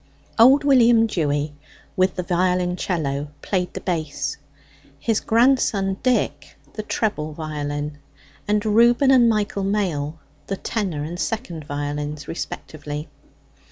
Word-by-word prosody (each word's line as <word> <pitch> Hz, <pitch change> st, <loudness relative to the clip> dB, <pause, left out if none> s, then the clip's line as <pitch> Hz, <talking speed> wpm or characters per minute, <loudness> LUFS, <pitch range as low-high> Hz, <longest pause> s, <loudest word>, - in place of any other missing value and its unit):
Old 265 Hz, +5 st, +7 dB
William 240 Hz, -5 st, +5 dB
Dewy, 150 Hz, -7 st, -1 dB, 0.4 s
with 185 Hz, 0 st, +2 dB
the 180 Hz, -, -2 dB
violoncello, 180 Hz, -5 st, 0 dB, 0.2 s
played 180 Hz, -2 st, -1 dB
the -, -, -4 dB
bass; 160 Hz, -5 st, -2 dB, 0.6 s
his 215 Hz, +10 st, 0 dB
grandson 225 Hz, -5 st, +2 dB
Dick 255 Hz, -1 st, 0 dB, 0.2 s
the 215 Hz, -, -4 dB
treble 205 Hz, -8 st, -2 dB
violin; 150 Hz, -1 st, -4 dB, 0.5 s
and 210 Hz, +1 st, +1 dB
Reuben 235 Hz, +5 st, +5 dB
and 245 Hz, -3 st, +6 dB
Michael 210 Hz, -2 st, 0 dB
Mail 175 Hz, -7 st, -1 dB, 0.3 s
the 195 Hz, -, -2 dB
tenor 185 Hz, -11 st, -2 dB
and 170 Hz, +3 st, -6 dB
second 185 Hz, -, -3 dB
violins 145 Hz, +1 st, -4 dB
respectively. 150 Hz, -2 st, -6 dB
180 Hz, 115 wpm, -22 LUFS, 150-220 Hz, 0.6 s, Old